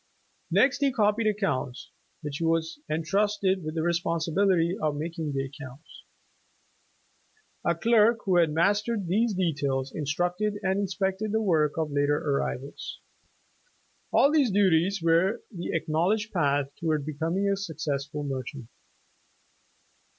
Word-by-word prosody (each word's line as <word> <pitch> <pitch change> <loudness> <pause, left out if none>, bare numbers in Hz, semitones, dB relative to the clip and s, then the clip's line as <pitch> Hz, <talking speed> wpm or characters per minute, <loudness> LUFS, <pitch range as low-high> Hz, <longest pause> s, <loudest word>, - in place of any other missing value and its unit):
Next 270 0 +3
he 280 -1 +2
copied 215 -2 +2
accounts, 195 - -2
after 160 - -22
which 145 -1 -3
he - - -2
was 165 - 0
entrusted 195 +3 0
with 155 +1 -5
the 160 - 0
respon 170 0 0
sibility 175 +1 +2
of 155 -6 0
making 160 0 -4
the 135 -1 -1
accounts. 135 +1 -12 1.6
A - - +1
clerk 230 0 +4
who 185 -3 +3
had 165 -3 +4
mas 200 +7 +3
tered 210 -3 -3
these 210 +5 +1
details, 140 -7 -1
instructed 175 +8 -1
and 190 +1 +1
inspected 195 +1 -1
the 220 - +1
work 155 -6 +2
of 160 -2 -1
later 145 +1 +2
arrivals. 140 -1 -3 1.1
All 280 - +5
these 295 -5 +3
duties 190 -2 +2
were 170 +5 +2
the 175 -4 -6
acknowledged 175 +8 0
path 145 -5 +1
toward 155 -4 0
becoming 165 +6 -1
a 200 - +2
successful 150 -5 -4
merchant. 130 -3 -5
170 Hz, 135 wpm, -27 LUFS, 150-200 Hz, 1.6 s, All